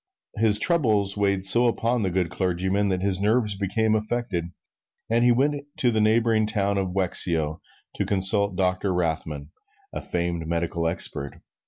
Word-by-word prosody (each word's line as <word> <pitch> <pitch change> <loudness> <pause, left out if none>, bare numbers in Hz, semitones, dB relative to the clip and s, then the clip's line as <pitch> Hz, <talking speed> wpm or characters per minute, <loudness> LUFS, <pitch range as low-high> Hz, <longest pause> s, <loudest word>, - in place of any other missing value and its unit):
His 105 -1 +2
troubles 105 - +1
weighed 100 -2 0
so 120 +5 +6
upon 120 +1 0
the 95 - 0
good 90 -2 -2
clergyman 95 +2 -1
that 95 -1 -2
his 95 -2 0
nerves 105 0 +1
became 105 +3 -1
affected 110 -5 -2 0.7
and 115 +1 +2
he 120 - +4
went 140 +4 0
to 125 - +2
the 110 -1 0
neighboring 110 0 +2
town 100 -2 -1
of 95 - -1
Wexio 85 -4 +2 0.4
to - - -1
consult 100 0 +2
Doctor 90 +1 -1
Rothman, 80 -4 -3 0.4
a - - -5
famed 85 -2 -3
medical 85 0 -2
expert. 70 -4 0
100 Hz, 155 wpm, -24 LUFS, 90-110 Hz, 0.7 s, so